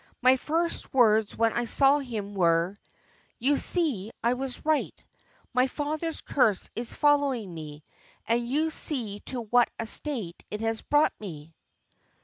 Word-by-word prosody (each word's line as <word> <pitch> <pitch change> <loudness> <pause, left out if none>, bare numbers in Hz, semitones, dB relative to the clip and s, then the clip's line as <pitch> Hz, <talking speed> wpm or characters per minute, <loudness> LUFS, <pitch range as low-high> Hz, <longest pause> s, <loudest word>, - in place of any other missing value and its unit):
My 255 +1 +5
first 330 +6 -2
words 220 -4 +4
when 225 0 +2
I 240 - -1
saw 275 +4 +4
him 220 -7 -5
were, 175 +1 +1 0.6
'You 275 +5 +2
see 275 - +2
I 235 +1 +3
was 255 +1 -5
right: 310 -1 0 0.6
my 250 +1 +3
father's 310 +4 -3
curse 220 -8 +1
is 235 +1 -5
following 280 - +1
me, 150 -2 -9 0.4
and 235 +1 0
you 310 +4 0
see 230 -11 0
to 250 -2 -3
what 240 +2 +3
a 225 - -1
state 225 - -2
it 210 - -5
has 225 0 -1
brought 295 +1 +2
me. 165 -6 -9
240 Hz, 145 wpm, -27 LUFS, 210-285 Hz, 0.6 s, My